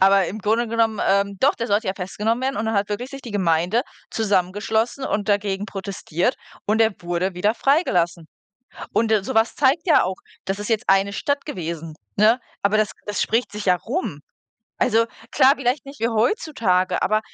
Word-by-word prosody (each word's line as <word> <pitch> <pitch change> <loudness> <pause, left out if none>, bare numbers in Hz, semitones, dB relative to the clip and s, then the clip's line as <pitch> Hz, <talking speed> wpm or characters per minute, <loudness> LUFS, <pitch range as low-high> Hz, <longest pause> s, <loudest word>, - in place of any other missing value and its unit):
Aber 195 0 +5
im 200 +6 -5
Grunde 225 +3 +1
genommen, 225 -2 +1
ähm 200 0 +2
doch, 280 - +4
der 230 - -3
sollte 210 +1 +1
ja 190 - -1
festgenommen 210 +6 -2
werden 265 +1 -1
und 215 - -2
dann 220 - 0
hat 200 0 +1
wirklich 235 +5 -4
sich 275 -1 -9
die 240 - -8
Gemeinde 180 +2 +1 0.3
zusammengeschlossen 215 +5 0
und 205 -4 -2
dagegen 200 -1 0
protestiert 195 +1 -2 0.3
und 215 +2 +2
er 225 -1 +4
wurde 175 +2 -2
wieder 205 +5 +1
freigelassen. 180 - +1 0.7
Und, 225 0 +2
äh, 215 -3 +3
so 260 - -4
was 225 +1 +3
zeigt 290 +3 +2
ja 320 -5 +5
auch 185 +1 -2 0.3
das 195 +1 -2
ist 205 - -5
jetzt 225 +1 0
eine 195 +1 +3
Stadt 285 +7 -1
gewesen, 165 - -5 0.2
ne? 220 +4 +5 0.2
Aber 200 +2 +2
das 215 -2 +1
das 205 -1 -2
spricht 225 -2 0
sich 210 0 -6
ja 180 -2 +5
rum. 225 - -4 0.6
Also, 230 +1 +3 0.3
klar, 265 +1 +6
vielleicht 255 +1 -1
nicht 275 +1 -11
wie 230 - +2
heutzutage, 225 - +1
aber 215 +1 +2
210 Hz, 190 wpm, -22 LUFS, 195-235 Hz, 0.7 s, klar